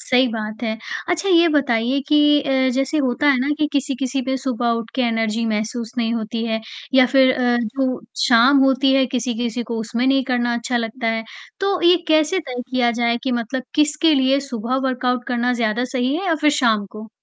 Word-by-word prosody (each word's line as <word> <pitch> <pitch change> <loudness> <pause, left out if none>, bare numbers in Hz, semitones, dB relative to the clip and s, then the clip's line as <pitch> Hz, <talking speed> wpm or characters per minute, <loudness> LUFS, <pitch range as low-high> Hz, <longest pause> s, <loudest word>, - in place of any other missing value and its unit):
सही 255 0 +2
बात 220 -1 -6
है, 220 -1 -2 0.3
अच्छा 355 +2 -1
ये 340 -2 +5
बताइए 265 -3 +1
कि 300 -1 +4 0.2
अ, 265 -2 +1
जैसे 270 +4 0
होता 270 +1 0
है 270 - +2
ना 270 - -1
कि 300 - +2
किसी-किसी 270 -1 -2
पे 265 +1 -2
सुबह 245 -3 -2
उठ 230 0 -8
के 260 - 0
एनर्जी 225 -1 -1
महसूस 220 +2 -3
नहीं 230 -1 0
होती 225 0 -3
है 225 -1 -2 0.3
या 260 -1 +6
फ़िर 260 0 +4
अ, 245 -1 +1
जो 255 +3 -2 0.3
शाम 250 +3 +5
होती 270 0 +2
है 270 -1 +4
किसी-किसी 240 -1 -3
को 230 0 -5
उसमें 230 +3 -2
नहीं 270 0 +2
करना 240 -2 0
अच्छा 235 +1 -2
लगता 230 +1 -3
है। 225 0 -1 0.4
तो, 390 -1 0
ये 350 +1 +6
कैसे 310 +3 +2
तय 255 -8 -6
किया 250 -2 +2
जाए 235 0 +1
कि 260 - -1
मतलब 240 +2 -3
किसके 300 +1 +2
लिए 270 0 +2
सुबह 250 -2 -3
वर्कआउट 250 -1 -1
करना 245 -1 0
ज़्यादा 235 0 -1
सही 255 +2 0
है 380 +3 -4
या 335 - +2
फ़िर 300 -1 +4
शाम 230 -8 +1
को? 215 +1 -10
250 Hz, 200 wpm, -20 LUFS, 235-275 Hz, 0.4 s, या